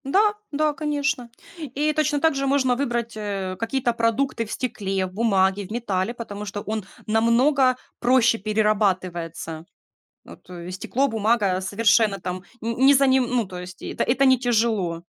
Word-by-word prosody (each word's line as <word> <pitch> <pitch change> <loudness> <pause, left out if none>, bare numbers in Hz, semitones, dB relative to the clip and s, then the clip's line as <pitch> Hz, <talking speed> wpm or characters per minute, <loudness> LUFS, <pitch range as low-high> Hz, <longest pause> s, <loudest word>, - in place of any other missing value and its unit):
Да, 410 +9 +3 0.2
да, 305 +1 +1
конечно. 290 -4 -2 0.3
И 300 +1 -1
точно 300 -1 +1
так 320 +1 +3
же 275 0 -1
можно 265 -2 +2
выбрать, 240 -3 -2
э, 200 -3 -4
какие-то 240 +2 0
продукты 230 +1 0
в 210 - -10
стекле, 195 -6 -2
в 185 - -9
бумаге, 195 -2 +1
в - - -14
металле, 220 -2 -1
потому 210 -3 -7
что 205 0 -5
он 215 -1 -4 0.2
намного 250 +4 +3 0.2
проще 240 -2 +3
перерабатывается. 185 -6 -1 0.6
Вот - - -15 0.2
стекло, 255 +9 -1
бумага 215 -4 +1
совершенно 205 +1 +2
там 180 +1 -5 0.2
не 230 +1 -2
не 270 +3 +6
за 275 0 +4
ним, 260 -1 +4
ну, 245 -1 0
то 180 -1 -8
есть 180 0 -10
это - - -2
это 265 +3 +2
не 260 -1 +5
тяжело. 220 -8 0
230 Hz, 160 wpm, -23 LUFS, 195-265 Hz, 0.6 s, не